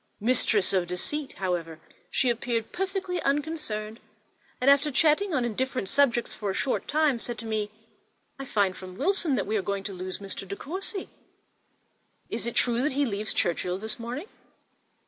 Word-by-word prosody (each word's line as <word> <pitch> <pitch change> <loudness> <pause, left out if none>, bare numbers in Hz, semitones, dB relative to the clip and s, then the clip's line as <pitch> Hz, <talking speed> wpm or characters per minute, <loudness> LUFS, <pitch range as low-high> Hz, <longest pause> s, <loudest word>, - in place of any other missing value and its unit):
Mistress 220 -3 +3
of 185 -2 +2
deceit, 270 - -2
however, 170 -4 -2 0.3
she 255 - +3
appeared 235 -1 -1
perfectly 380 -2 -2
unconcerned, 275 -7 -1 0.6
and 250 - 0
after 280 +2 +6
chatting 315 +7 +3
on 260 -6 +2
indifferent 245 -2 -1
subjects 245 -5 +3
for 205 - -3
a 190 - -1
short 270 - 0
time, 300 -4 +3
said 240 0 -4
to 230 - -7
me, 215 -2 -1 0.7
"I 275 - -4
find 200 -6 +2
from 185 -1 -9
Wilson 355 - +2
that 200 - 0
we 215 - -1
are - - +1
going 195 +1 -2
to 200 - -4
lose 185 0 -4
Mr. 195 -1 -6
De 200 - -4
Courcy—is 345 - -7
it 235 - -3
true 240 -1 +3
that 285 +1 +1
he 285 +1 +2
leaves 215 -2 -1
Churchhill 180 0 0
this 215 +3 -4
morning?" 245 +8 -4
235 Hz, 165 wpm, -28 LUFS, 200-285 Hz, 0.7 s, after